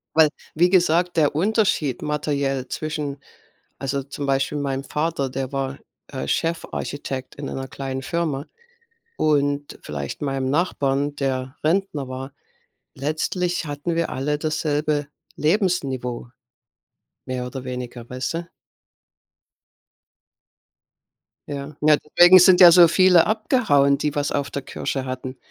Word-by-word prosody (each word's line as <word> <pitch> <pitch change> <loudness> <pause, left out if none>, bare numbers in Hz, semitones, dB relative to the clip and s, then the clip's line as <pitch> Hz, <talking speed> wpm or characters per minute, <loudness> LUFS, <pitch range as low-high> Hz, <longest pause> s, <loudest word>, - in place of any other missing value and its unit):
Weil, 160 -1 +7 0.3
wie 175 +3 +4
gesagt, 175 -1 +3
der 150 -3 +3
Unterschied 185 - +1
materiell 140 -3 -1
zwischen 150 -2 -4 0.6
also 135 +1 -2
zum 140 +1 -6
Beispiel 135 +2 0
meinem 135 -1 -2
Vater, 150 -3 -1
der 130 +1 -4
war, 135 0 -3 0.3
äh, 130 - -5
Chefarchitekt 145 -5 -3
in 140 -1 -6
einer 135 0 -5
kleinen 135 0 -5
Firma 155 -2 -2 0.7
und 145 -1 0
vielleicht 70 - -6
meinem 135 -2 -1
Nachbarn, 145 -3 0
der 130 -1 -2
Rentner 160 -4 0
war, 130 +1 -6 0.6
letztlich 160 +5 -1
hatten 145 +3 -3
wir 170 - 0
alle 150 +3 -1
dasselbe 150 -1 -1 0.3
Lebensniveau. 145 - 0 1.0
Mehr 125 -1 -3
oder 130 0 -6
weniger, 125 -2 -6
weißt 130 +5 -3
du? 170 0 -5 3.0
Ja. 140 0 -6
Ja, 150 0 +5
deswegen 175 +5 +7
sind 180 0 +6
ja 175 -1 +11
so 175 0 +8
viele 180 0 +5
abgehauen, 145 - +2
die 150 -1 -1
was 145 -1 -1
auf 140 -1 -2
der 140 - -4
Kirsche 135 0 -4
hatten, 130 0 -5
145 Hz, 120 wpm, -22 LUFS, 135-160 Hz, 3.0 s, ja